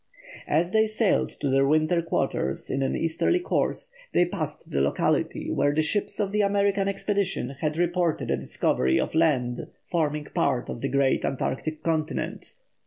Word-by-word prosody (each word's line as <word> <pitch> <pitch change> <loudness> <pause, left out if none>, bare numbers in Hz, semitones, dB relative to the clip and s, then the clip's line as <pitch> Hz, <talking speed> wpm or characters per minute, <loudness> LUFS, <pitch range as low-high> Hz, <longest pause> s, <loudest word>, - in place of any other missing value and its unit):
As 170 +4 +1
they 220 +1 +4
sailed 215 -1 +1
to - - 0
their 135 +1 +4
winter 155 +3 +3
quarters 65 - -1
in 135 - 0
an 135 - 0
easterly 165 - +1
course, 485 +6 -1 0.2
they 175 - +4
passed 155 -5 -5
the 70 - +1
locality 70 +1 0
where 145 0 +1
the 155 - +3
ships 205 +7 -1
of 200 -2 0
the 210 +1 +2
American 200 -1 +2
expedition 200 -1 -1
had 155 0 -1
reported 175 -1 0
a - - +3
discovery 65 +1 +1
of - - -2
land 135 -7 +1 0.2
forming 150 -3 -1
part 125 -1 0
of 115 - -5
the 135 - -1
great 135 0 +2
Antarctic 150 +3 -2
continent. 160 -1 -2
160 Hz, 165 wpm, -26 LUFS, 140-195 Hz, 0.2 s, they